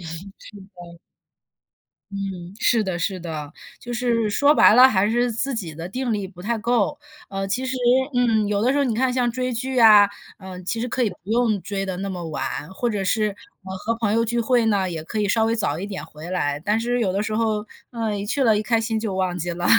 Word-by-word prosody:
是 165 -1 -7 0.6
的。 170 -1 -11 1.1
嗯， 195 -3 -5
是 230 -3 +2
的 180 -2 -2
是 185 +2 -2
的， 155 -3 -6 0.3
就 240 - -7
是 235 -2 +1
说 285 +8 +4
白 215 - +7
了， 255 +2 +9
还 205 -4 +2
是 240 +1 +1
自 270 +4 -2
己 175 -9 -5
的 165 +2 -6
定 250 +3 -2
力 200 -3 -2
不 180 -2 -13
太 230 +2 -1
够。 240 +4 0 0.3
呃， 195 0 -3
其 250 +6 -1
实， 260 0 -2 0.4
嗯， 225 -4 +2
有 205 -1 0
的 245 +4 +2
时 280 - +1
候 285 - +3
你 235 -4 0
看 260 +3 +1
像 245 -1 +1
追 255 +1 -2
剧 255 +2 -2
啊， 210 -3 +8 0.3
嗯， 185 -1 -9
其 225 - -2
实 240 - -1
可 255 +1 -1
以 225 - +2
不 180 - -10
用 225 -3 +2
追 195 -1 -3
得 185 -1 -3
那 195 +1 -3
么 180 -2 -5
晚， 150 0 -4
或 240 +4 -1
者 205 -2 -2
是， 215 +3 +1 0.4
呃， 190 0 -6
和 230 +4 -1
朋 220 -3 0
友 230 - +3
聚 235 +1 -1
会 235 0 +2
呢， 195 -4 +1
也 160 -2 -5
可 215 +6 -5
以 205 - +1
稍 225 +2 +2
微 230 +1 0
早 155 -8 -1
一 195 - -4
点 195 -7 -6
回 160 +1 -10
来。 145 -6 -1
但 210 +7 +1
是， 245 +1 -1
有 190 -5 +1
的 200 - 0
时 215 0 -3
候， 215 -1 0 0.3
嗯， 225 -3 -2
一 200 - -4
去 270 +4 0
了 220 -2 +4
一 - - -1
开 230 +1 +1
心 225 -1 -1
就 210 -4 -3
忘 185 -1 -1
记 175 +1 -3
了， 175 +1 -4
215 Hz, 260 characters per minute, -22 LUFS, 185-235 Hz, 1.1 s, 了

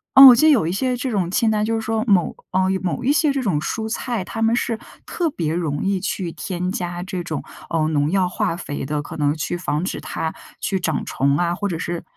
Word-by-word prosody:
嗯， 270 +1 +12
我 250 - +10
记 310 +7 +4
得 - - +7
有 245 - +4
一 165 - 0
些 250 +6 0
这 250 +1 -2
种 190 -5 0
清 220 +4 +2
单， 210 -1 +1
就 225 +1 0
是 225 - -1
说 220 0 -1
某 190 -5 +3 0.2
嗯， 185 0 +2
有 190 - -2
某 185 +4 -2
一 275 +4 +3
些 305 -1 +3
这 275 -1 -1
种 185 -10 +1
蔬 220 +7 -3
菜， 235 -2 -2
它 225 +4 -6
们 225 +1 +3
是 230 -2 -1 0.3
特 345 -2 -1
别 165 - -2
容 160 -4 -2
易 195 -1 +1
去 185 -2 -3
添 180 +1 -3
加 175 -2 -3
这 185 -1 -4
种， 160 -4 -4 0.3
呃， 160 -2 +1
农 145 -1 +1
药 185 +1 +2
化 175 -1 -1
肥 150 -5 -5
的。 150 +2 -2
可 - - -7
能 145 -1 +1
去 160 +3 -3
防 155 -2 -2
止 - - -4
它 160 - -3 0.3
去 195 -2 -1
长 160 -4 -1
虫 140 +1 +1
啊， 175 +1 +1
或 205 - -2
者 170 - -2
是 170 0 -3
185 Hz, 270 characters per minute, -21 LUFS, 165-225 Hz, 0.3 s, 嗯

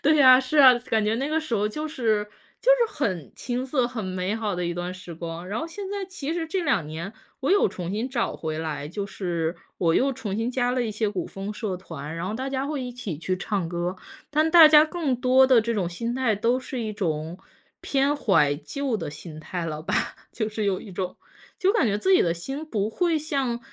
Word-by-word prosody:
对 310 +2 +4
呀， 255 -3 +8
是 265 +3 0
啊， 260 -3 +9
感 225 -3 0
觉 215 +1 +1
那 275 +4 -1
个 320 +1 +1
时 310 -7 -3
候 205 +1 +1
就 305 +8 -4
是 220 -7 0 0.4
就 - - +3 0.2
是 425 - -17
很 185 - -2
青 250 +1 -3
涩、 260 -2 +1
很 230 -5 -5
美 185 +2 -2
好 215 -4 -2
的 180 0 -2
一 170 - -1
段 175 +1 -4
时 180 -2 -9
光。 170 +2 -6
然 210 - -2
后 325 - -3
现 390 +3 -7
在 400 -1 -3
其 310 -5 -4
实 330 -1 -2
这 360 +2 -1
2 225 - +1
年， 165 +6 -6 0.3
我 270 - 0
有 405 +1 +5
重 175 -1 -5
新 220 +6 -2
找 245 -3 -1
回 155 -1 -4
来， 150 -2 -4
就 195 +6 -4
是 170 -4 -3 0.2
我 165 -2 +3
又 270 +1 +3
重 205 -5 -4
新 225 +2 -1
加 245 -1 0
了 250 -1 0
一 - - -2
些 215 -1 0
古 185 -4 -3
风 195 +2 -6
社 210 -4 -3
团， 150 -4 -7
然 165 +1 -4
后 - - -3
大 260 +4 -3
家 270 0 -2
会 285 -1 -3
一 250 -1 -5
起 205 -11 -5
去 185 +3 -1
唱 195 -2 -2
歌。 175 +2 -2 0.3
但 310 +2 +3
大 325 -1 +9
家 305 0 +8
更 310 -6 -1
多 255 +1 +5
的 255 -3 +6
这 230 +1 -1
种 185 -5 0
心 230 +7 -3
态 250 -5 +1
都 235 +5 +1
是 255 -1 -5
一 215 -1 -3
种 165 -4 -2 0.4
偏 275 +1 +1
怀 190 - +3
旧 270 - -3
的 165 -7 -5
心 155 +1 -9
态 175 +2 -4
了 155 -1 -4
吧， - - -2 0.4
就 220 -2 -2
是 215 0 -3
有 195 -2 0
一 200 - -10
种 180 0 -4 0.4
就 390 -1 +3
感 295 - +3
觉 205 +1 0
自 380 - +2
己 - - +6
的 170 - +1
心 270 - -5
不 215 -9 -1
会 335 +6 +1
像 275 -6 -1
225 Hz, 255 characters per minute, -25 LUFS, 180-270 Hz, 0.4 s, 啊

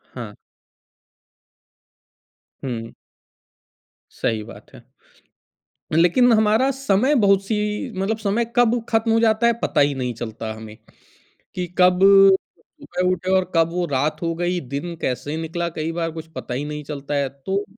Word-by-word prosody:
हाँ। - - -7 2.3
हुँ। 115 -3 -5 1.2
सही 110 -1 -2
बात - - -14
है। - - -14 1.1
लेकिन 180 +10 +4
हमारा 220 +4 +3
समय 265 0 +1
बहुत-सी 195 +2 +2 0.4
मतलब 215 +3 -1
समय 215 +2 0
कब 245 0 +3
खत्म 225 0 +1
हो 225 - +3
जाता 220 0 +3
है, 235 - +5
पता - - +1
ही 145 0 +3
नहीं 125 -2 -3
चलता 110 -1 -6
हमें। 110 -1 -10 0.8
कि 180 - -2
कब 180 0 +5 0.6
सुबह 235 - -4
उठे 185 +1 -2
और 185 -1 0
कब 165 0 +4
वो 175 0 -1
रात 145 +1 -1
हो 165 -1 -1
गई, 175 +1 -1
दिन 145 +4 -5
कैसे 145 +4 -2
निकला, 170 +1 -3
कई 160 0 -4
बार 165 0 -2
कुछ 160 0 -8
पता - - -5
ही 135 +4 -3
नहीं 150 0 -5
चलता 145 0 -5
है। 140 -1 0
तो 190 +10 -3
170 Hz, 145 wpm, -22 LUFS, 145-210 Hz, 2.3 s, है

